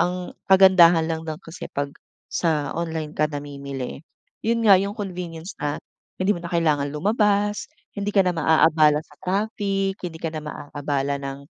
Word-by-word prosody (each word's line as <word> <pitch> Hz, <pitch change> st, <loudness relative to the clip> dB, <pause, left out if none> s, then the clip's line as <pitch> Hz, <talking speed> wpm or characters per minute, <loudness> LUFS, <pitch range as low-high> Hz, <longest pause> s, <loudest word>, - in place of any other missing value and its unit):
Ang 180 Hz, +1 st, -1 dB, 0.2 s
kagandahan 185 Hz, -4 st, +7 dB
lang 160 Hz, 0 st, -2 dB
dun 155 Hz, -, -3 dB
kasi 165 Hz, -, -8 dB
'pag 140 Hz, 0 st, -3 dB, 0.4 s
sa 155 Hz, -4 st, 0 dB
online 160 Hz, -2 st, -3 dB
ka 155 Hz, 0 st, +1 dB
namimili, 140 Hz, -3 st, -6 dB, 0.4 s
yun 230 Hz, +1 st, +1 dB
nga, 200 Hz, -, +8 dB
yung 200 Hz, +2 st, -3 dB
convenience 180 Hz, -3 st, -6 dB
na 145 Hz, 0 st, -1 dB, 0.4 s
hindi 190 Hz, +2 st, +2 dB
mo 175 Hz, -, -6 dB
na 170 Hz, -, -5 dB
kailangan 155 Hz, -4 st, +1 dB
lumabas, 205 Hz, +5 st, +1 dB, 0.3 s
hindi 205 Hz, 0 st, -3 dB
ka 195 Hz, -2 st, +4 dB
na 180 Hz, -, +3 dB
maaabala 160 Hz, -1 st, +4 dB
sa -, -, -20 dB
traffic, 195 Hz, 0 st, -1 dB
hindi 175 Hz, -3 st, -5 dB
ka 160 Hz, -1 st, -4 dB
na 155 Hz, -, -3 dB
maaabala 145 Hz, -1 st, -3 dB
ng 135 Hz, 0 st, -5 dB
165 Hz, 160 wpm, -23 LUFS, 150-195 Hz, 0.4 s, nga